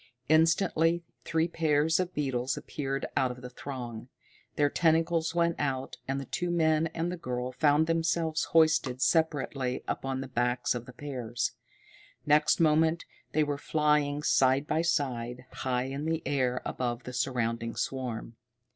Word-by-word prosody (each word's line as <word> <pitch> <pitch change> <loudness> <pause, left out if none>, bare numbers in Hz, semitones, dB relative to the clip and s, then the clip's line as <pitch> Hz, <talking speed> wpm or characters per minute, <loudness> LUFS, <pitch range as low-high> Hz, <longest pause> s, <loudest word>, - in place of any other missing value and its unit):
Instantly 165 +1 +3 0.2
three 160 0 +1
pairs 160 -1 +2
of 185 -1 -2
beetles 130 -3 -1
appeared 135 -2 -3
out 130 - +2
of 125 0 -8
the 125 - -7
throng. 125 -3 -7 0.5
Their 145 - +3
tentacles 165 +1 +2
went 170 -1 +2
out, 135 -2 -2
and 135 +1 -1
the 135 - -6
two 175 +7 -2
men 160 -2 +2
and 170 +1 -1
the 180 - -4
girl 125 -5 -3
found 150 +3 +3
themselves 165 -1 0
hoisted 155 -6 +3
separately 145 -4 +1
upon 135 0 -2
the 135 - -5
backs 125 0 0
of 120 -1 -6
the 125 - -10
pairs. 125 -4 -3 0.7
Next 150 0 +4
moment 160 +1 +3 0.3
they 155 - +3
were 145 -1 -2
flying 150 -1 +1
side 135 0 +3
by 155 +2 +1
side, 125 -7 -1
high 125 -1 -1
in 135 +3 -4
the 160 0 -1
air 125 -3 0
above 120 -1 -3
the 125 - -7
surrounding 115 -2 -1
swarm. 120 -3 -4
145 Hz, 150 wpm, -29 LUFS, 125-160 Hz, 0.7 s, Next